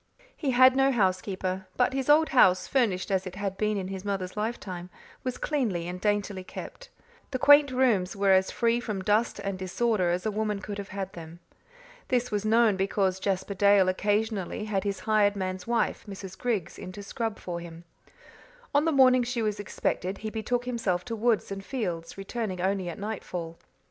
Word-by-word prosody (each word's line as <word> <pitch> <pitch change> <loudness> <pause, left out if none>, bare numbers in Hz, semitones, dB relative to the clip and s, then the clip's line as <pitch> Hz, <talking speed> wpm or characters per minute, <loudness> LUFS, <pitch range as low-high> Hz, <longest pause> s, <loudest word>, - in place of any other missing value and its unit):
He 290 - -2
had 255 +1 +6
no 270 0 +4
housekeeper; 190 -3 -1
but 250 +1 +2
his 270 +1 -2
old 310 +2 +6
house, 185 -8 +5
furnished 210 -8 +1
as 190 0 0
it 185 - -7
had 195 -1 -3
been 210 +1 0
in 190 -1 -4
his 190 -1 -6
mother's 195 -3 -3
lifetime, 200 -5 -4 0.3
was 255 -1 -3
cleanly 220 - -1
and 180 +1 -6
daintily 205 -2 0
kept. - - -9 0.4
The 260 - -2
quaint 285 +2 +7
rooms 240 -9 +2
were 200 -1 +3
as 190 0 +4
free 235 0 +1
from 210 -5 -4
dust 215 +4 +1
and 195 -1 -4
disorder 190 0 0
as 175 +3 -1
a 215 - +1
woman 210 -1 -1
could 205 0 -6
have 200 - -6
had 195 -1 -5
them. 165 0 -10 0.7
This 250 -1 0
was 205 -1 -1
known, 220 -2 +4
because 190 -1 0
Jasper 195 0 -1
Dale 200 -1 +5
occasionally 210 +1 -1
had 200 -3 -1
his 200 -2 -2
hired 205 0 +3
man's 185 -1 -4
wife, 235 -1 0
Mrs. 190 -1 -8
Griggs, 210 -5 -2
in 185 - -7
to 205 +1 -8
scrub 225 +2 -3
for 175 -1 -5
him. 170 0 -10 0.9
On 290 +2 +3
the 325 - +2
morning 255 -3 +6
she 240 -1 -2
was 210 -1 -1
expected 190 -1 -2
he 215 +1 -5
betook 240 +3 -2
himself 225 -8 -1
to 230 -2 -4
woods 225 -2 +1
and 195 0 -5
fields, 180 -10 -4
returning 195 -1 -4
only 190 0 0
at 170 - -6
night 210 +1 -4
fall. 165 -2 -6
205 Hz, 190 wpm, -27 LUFS, 185-235 Hz, 0.9 s, quaint